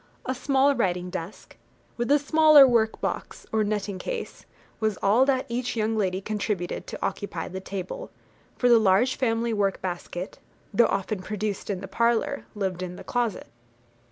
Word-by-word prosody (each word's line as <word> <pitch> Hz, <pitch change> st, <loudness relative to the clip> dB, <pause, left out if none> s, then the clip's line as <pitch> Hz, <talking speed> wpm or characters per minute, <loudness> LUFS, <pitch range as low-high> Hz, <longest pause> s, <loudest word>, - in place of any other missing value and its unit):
A 260 Hz, -, -1 dB
small 270 Hz, +2 st, +2 dB
writing 180 Hz, -7 st, -1 dB
desk, 180 Hz, +1 st, -7 dB, 0.4 s
with 240 Hz, +1 st, -2 dB
a 290 Hz, -, +6 dB
smaller 305 Hz, -1 st, +7 dB
work 225 Hz, -3 st, +2 dB
box, -, -, -4 dB
or 220 Hz, -1 st, +2 dB
netting 205 Hz, -2 st, -2 dB
case, -, -, -6 dB, 0.3 s
was 215 Hz, -2 st, 0 dB
all 225 Hz, +7 st, +5 dB
that 265 Hz, -1 st, +1 dB
each 245 Hz, +1 st, -2 dB
young 220 Hz, 0 st, 0 dB
lady 190 Hz, -3 st, 0 dB
contributed 205 Hz, -4 st, -3 dB
to -, -, -4 dB
occupy 175 Hz, -5 st, -4 dB
the 185 Hz, -, -6 dB
table; 190 Hz, -1 st, -6 dB, 0.5 s
for 245 Hz, -, +2 dB
the 235 Hz, -1 st, +7 dB
large 220 Hz, +5 st, +3 dB
family 230 Hz, -2 st, 0 dB
work 200 Hz, -2 st, 0 dB
basket, 180 Hz, 0 st, -5 dB, 0.3 s
though 235 Hz, +4 st, +5 dB
often 195 Hz, 0 st, -2 dB
produced 210 Hz, +1 st, -4 dB
in 190 Hz, -3 st, -2 dB
the 195 Hz, -, -6 dB
parlour, 235 Hz, +6 st, 0 dB
lived 190 Hz, -3 st, -2 dB
in 180 Hz, -1 st, -5 dB
the -, -, -10 dB
closet. 240 Hz, -5 st, -2 dB
215 Hz, 165 wpm, -26 LUFS, 190-245 Hz, 0.5 s, smaller